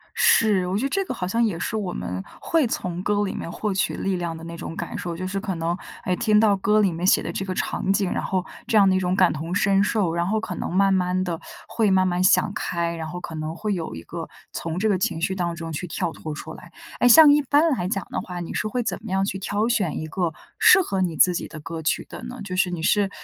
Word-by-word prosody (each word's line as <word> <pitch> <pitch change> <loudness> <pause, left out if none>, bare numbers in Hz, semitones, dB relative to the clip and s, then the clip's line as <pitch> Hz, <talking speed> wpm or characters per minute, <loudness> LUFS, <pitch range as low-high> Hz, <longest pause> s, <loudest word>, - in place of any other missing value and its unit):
是， 205 -5 +4
我 185 +2 -1
觉 220 - -1
得 - - +1
这 390 +6 0
个 - - -4
好 180 - -3
像 230 +6 +1
也 200 -7 -1
是 220 - -2
我 195 -4 -2
们 90 - -4 0.2
会 325 -5 +2
从 180 -5 -3
歌 205 +1 +1
里 195 - -3
面 - - -5
获 210 +4 -2
取 190 - 0
力 195 -1 -1
量 170 -2 -3
的 160 - -10
那 170 0 -7
种 165 - -6
感 - - -5
受。 170 -1 -4
就 185 +2 -4
是 195 +1 -3
可 195 -2 -3
能 165 +1 -1 0.3
哎 185 - 0
听 215 -1 +3
到 210 -2 +4
歌 210 +2 +2
里 200 -3 +3
面 170 +2 -2
写 - - +4
的 - - -4
这 195 - -3
个 185 -1 -3
场 190 - -1
景， 195 -2 +1
然 - - -1
后 185 -1 -1 0.2
这 225 - +1
样 200 -2 +6
的 190 - +3
一 - - +3
种 180 0 0
感 185 -2 +4
同 160 +4 -4
身 195 0 +3
受。 205 -5 +1
然 170 0 0
后 215 +3 0
可 215 -4 -5
能 - - -4
慢 195 +1 +3
慢 185 0 +1
地 170 -3 -3 0.3
会 220 -3 +1
慢 185 -1 +4
慢 180 0 0
想 195 +2 +4
开， 170 -4 -2
然 160 -1 -5
后 180 +2 -6
可 165 - -7
能 155 0 -4
会 210 +3 -2
有 165 -3 -4
一 80 - -8
个 - - -7 0.2
从 165 +1 -4
这 220 +3 +1
个 200 -3 +2
情 165 -3 -1
绪 190 - 0
当 175 -2 -2
中 165 -1 -6
去 170 +4 -4
跳 175 0 -2
脱 155 -1 -6
出 160 +1 -8
来。 170 - -14 0.3
哎， 245 - +5
像 295 +5 +9
一 295 0 +4
般 290 +4 +3
来 180 - -1
讲 195 -1 -2
的 - - -2
话， 180 -1 -6
你 170 - -5
是 - - -1
会 245 +3 -1
怎 225 - -2
么 - - -7
样 190 +1 +1
去 195 -1 -3
挑 205 +3 -1
选 200 -9 0
一 155 - -4
个 170 +1 -2 0.3
适 - - +7
合 195 - -2
你 175 -4 -1
自 180 +3 +5
己 - - -3
的 155 - -9
歌 160 +2 -6
曲 155 - 0
的 - - -9
呢？ 245 -1 -8
就 185 -2 -4
是 185 -1 +2
你 175 -2 -4
是， 200 +3 +2
185 Hz, 305 characters per minute, -24 LUFS, 170-205 Hz, 0.3 s, 像